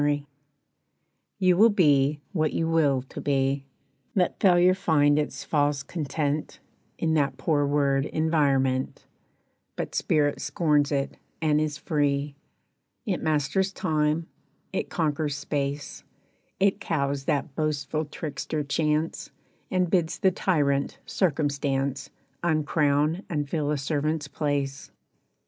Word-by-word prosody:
=Will= 145 0 +2 1.2
You 185 -2 +3
will 225 +4 +7
be 145 -7 +3
what 155 -6 0
you 165 - 0
will 145 -6 +2
to 130 - -9
be; 135 0 0 0.5
Let 180 -3 +1
failure 180 -1 +5
find 150 -6 +3
its 150 - -3
false 145 -2 +1
content 150 -1 -3 0.4
In 160 -1 0
that 140 -4 +1
poor 145 +1 +1
word 140 -1 +2
"environment," 140 -5 +1 0.7
But - - -4
spirit 145 -2 +1
scorns 150 -4 +1
it, 140 -1 -1 0.2
and 155 -1 +2
is 155 -1 -2
free, 145 -2 0 0.7
It 195 -6 -1
masters 155 +6 +1
time, 155 -3 0 0.5
it - - -2
conquers 150 -3 -1
space, 145 0 -3 0.6
It 195 0 +2
cows 140 -3 -1
that 145 -1 -1
boastful 155 0 -1
trickster 150 0 -4
Chance, 150 +2 -1 0.4
And 185 -1 +1
bids 170 -2 +1
the 190 - +3
tyrant 145 -7 0
Circumstance 140 -5 -1 0.3
Uncrown 155 +1 +1
and 150 -3 -1
fill 150 0 -1
a 150 - +1
servant's 150 +2 -1
place. 145 -2 -2
150 Hz, 120 wpm, -26 LUFS, 140-160 Hz, 1.2 s, will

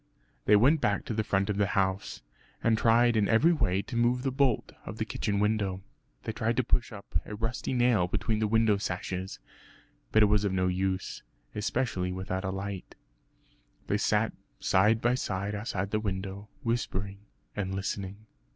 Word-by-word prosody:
They 105 - +6
went 140 +9 +5
back 100 -1 +1
to - - -3
the 110 0 0
front 100 -2 +1
of 105 -2 -1
the 100 -1 +2
house, 95 -6 -1 0.4
and 115 -1 +4
tried 115 +1 +4
in 105 -2 +3
every 150 +10 +5
way 95 - +1
to 125 - -7
move 120 +2 +2
the 135 - 0
bolt 130 -3 +1
of - - -7
the - - -1
kitchen 100 -1 -1
window. 100 -3 0 0.4
They - - -2
tried 110 +2 -1
to 130 - +3
push 120 +1 +1
up 100 -6 -4
a 105 - -7
rusty 115 +5 -3
nail 120 -7 +3
between 110 +4 -1
the 110 - +1
window 110 -1 +3
sashes; 95 0 -4 0.7
but 110 - +5
it - - +7
was 105 0 +3
of 100 -2 0
no 90 -1 +1
use, 95 +1 -1 0.3
especially 105 -4 -1
without 95 +1 -3
a 95 - -1
light. 95 0 -5 0.9
They - - 0
sat - - +2 0.3
side 105 +4 +3
by 120 +1 +3
side 100 -4 -2
outside 100 -2 -3
the 110 - +1
window, 100 0 -4
whispering 100 -4 -2 0.4
and 95 -2 -2
listening. 95 +1 -4
105 Hz, 180 wpm, -29 LUFS, 95-115 Hz, 0.9 s, it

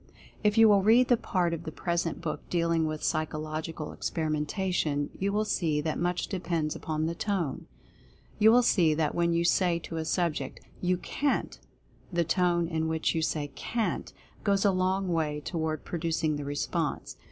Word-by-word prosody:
If 210 +1 +2
you 225 0 +8
will 205 -2 +5
read 230 +5 +5
the 245 - +6
part 180 -6 0
of 165 - -3
the 160 - -5
present 170 0 -2
book 160 -2 -3
dealing 170 -2 +1
with 155 0 -4
Psychological 155 0 -2
Experimentation, 155 -1 -1
you 195 +1 0
will 210 +1 +1
see 160 -7 0
that 155 +1 -2
much 175 0 0
depends 170 -5 -2
upon 155 0 -2
the 165 - -1
Tone. 175 -6 -2 0.7
You 220 +1 +7
will 245 +2 +6
see 165 -9 +4
that 155 -1 0
when 170 0 +1
you 170 0 +1
say 175 -1 +3
to 165 0 -6
a 160 - -2
subject, 155 -5 -1 0.2
"You 180 0 +1
CAN'T," 280 +9 -1 0.5
the 170 -1 +2
tone 175 0 +2
in 160 -1 -1
which 160 0 0
you 165 - 0
say 150 -2 -1
"CAN'T" 225 - -2 0.3
goes 200 0 +2
a 200 - +5
long 185 +1 0
way 155 -4 0
toward 160 0 -3
producing 165 -2 -1
the 145 -1 -5
response. 145 0 -2
170 Hz, 175 wpm, -29 LUFS, 155-185 Hz, 0.7 s, you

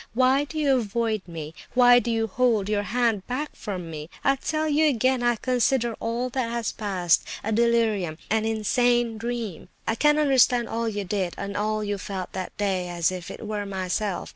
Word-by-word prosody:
Why 260 +3 +3
do 310 - -8
you 280 -3 +3
avoid 220 -1 -1
me? 160 -2 -7 0.2
Why 245 -1 +7
do 240 - -3
you 225 -1 +1
hold 225 -2 +1
your 210 -1 +1
hand 225 -1 0
back 285 +4 -3
from 180 -6 -6
me? 155 0 -7
I 275 - +4
tell 310 +3 -2
you 310 +1 +3
again, 255 0 +1
I 240 0 +2
consider 245 0 +1
all 235 +2 -2
that 250 -2 -1
has 235 -1 -2
passed 185 -5 +1 0.2
a 220 - -2
delirium, 220 -7 +2
an 220 0 +2
insane 230 +1 +1
dream. 230 -5 -4 0.2
I - - +1
can 295 +6 +3
understand 255 -5 +4
all 230 0 -1
you 205 -1 -3
did, 190 -2 -2
and 200 0 -5
all 215 +1 -1
you 205 -1 -2
felt 185 -2 -5
that 185 -1 -6
day, 190 -3 0
as 175 0 +1
if 180 -1 -6
it - - -8
were 210 -1 -3
myself. 190 +1 -2
225 Hz, 190 wpm, -25 LUFS, 200-245 Hz, 0.2 s, Why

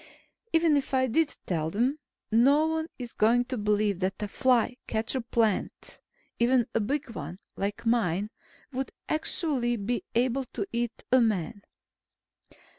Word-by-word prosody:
Even 325 -2 +4
if 275 -1 -1
I 260 0 +3
did 290 +5 +1
tell 160 -3 -1
them, 245 - 0 0.3
no 275 +7 +5
one 320 0 -1
is 245 -2 -7
going 235 +3 +3
to 255 - -3
believe 210 -3 +1
that 190 0 0
a - - -1
fly 250 +2 +2
catcher 225 +4 -1
plant 230 -3 -1 0.4
even 240 0 +4
a - - +2
big 260 +4 -2
one 175 -4 -6 0.2
like 205 +3 -3
mine 210 -3 +1 0.4
would 265 +1 -3 0.2
actually 295 -6 0
be 235 +3 -2
able 255 +2 +1
to 205 - -2
eat 235 0 -2
a 255 0 +6
man. 205 -4 0
235 Hz, 145 wpm, -28 LUFS, 210-260 Hz, 0.4 s, a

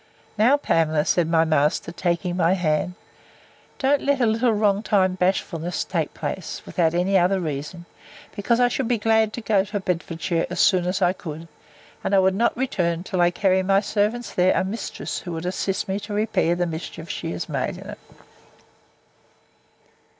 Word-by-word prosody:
Now, 235 +7 +4
Pamela, 160 - +1
said 170 -2 +1
my 165 -1 +3
master, 155 +1 +1
taking 175 0 -1
my 175 0 +3
hand, 175 0 0 0.8
don't 275 +1 +2
let 280 -1 +1
a 245 - +3
little 230 +2 +2
wrong 205 -2 +2
timed 190 -4 +1
bashfulness 180 -2 -1
take - - -3
place, - - -5
without 170 -2 0
any 190 +2 +3
other 185 +2 +2
reason, 155 +2 -5 0.5
because 230 +3 +1
I 245 - +5
should 245 0 -2
be 240 -1 +1
glad 220 0 +2
to 235 - -5
go 210 -3 +2
to 205 +1 -4
Bedfordshire 170 -2 -2
as 180 0 -4
soon 185 -3 +4
as 185 +1 0
I 180 - +3
could; 165 -3 -8 0.6
and 200 - +1
I - - +6
would 190 0 +3
not 230 +4 +1
return 175 -10 -1
till 185 -1 -1
I 175 - +5
carry 190 +1 +2
my 195 +1 +3
servants 215 +3 -1
there 180 +1 +3
a - - 0
mistress, 200 +5 -4
who 175 -3 -6
should 160 - -6
assist 190 +1 -2
me 195 +1 -2
to 205 0 -6
repair 205 -5 +1
the 175 0 0
mischiefs 160 -1 -6
she - - -5
has 85 - -4
made - - -2
in - - -10
it. - - -10
185 Hz, 180 wpm, -23 LUFS, 170-210 Hz, 0.8 s, I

